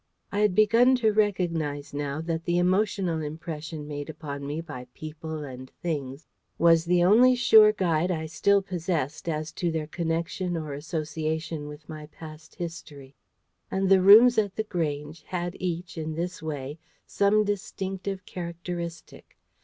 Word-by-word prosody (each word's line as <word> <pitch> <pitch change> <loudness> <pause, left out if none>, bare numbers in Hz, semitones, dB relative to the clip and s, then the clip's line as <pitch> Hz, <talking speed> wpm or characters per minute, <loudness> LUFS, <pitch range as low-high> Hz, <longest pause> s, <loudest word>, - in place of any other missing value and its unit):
I 200 - -1
had 210 -3 +3
begun 230 +5 +5
to 225 -3 +2
recognise 170 -9 0
now 145 +1 -3
that 165 0 -3
the 175 0 +1
emotional 185 -2 +1
impression 155 0 -6
made 145 0 -5
upon 140 -3 -6
me 150 +2 -3
by 145 -7 -8
people 155 0 -6
and 130 -2 -9
things 145 -4 -5 0.3
was 165 -1 +5
the 175 0 +3
only 240 +7 +6
sure 220 -3 +7
guide 180 -4 0
I 160 -3 -2
still 195 +5 +2
possessed 170 -5 -3
as 155 0 -3
to 175 +1 -2
their 160 -2 -2
connection 170 +2 -2
or 155 -3 -5
association 155 0 -3
with 150 +1 -11
my 155 -1 -8
past 155 0 -12
history. 145 -6 -8 0.5
And 190 0 0
the 190 -1 +6
rooms 220 +5 +8
at 205 -3 -1
The 220 - -1
Grange 155 -5 -3
had 175 -1 -4
each 175 -1 -4
in 155 0 -4
this 175 +2 -4
way 150 -1 -5 0.3
some 205 +1 +3
distinctive 195 -2 -4
characteristic. 170 -1 -7
165 Hz, 150 wpm, -27 LUFS, 155-185 Hz, 0.5 s, rooms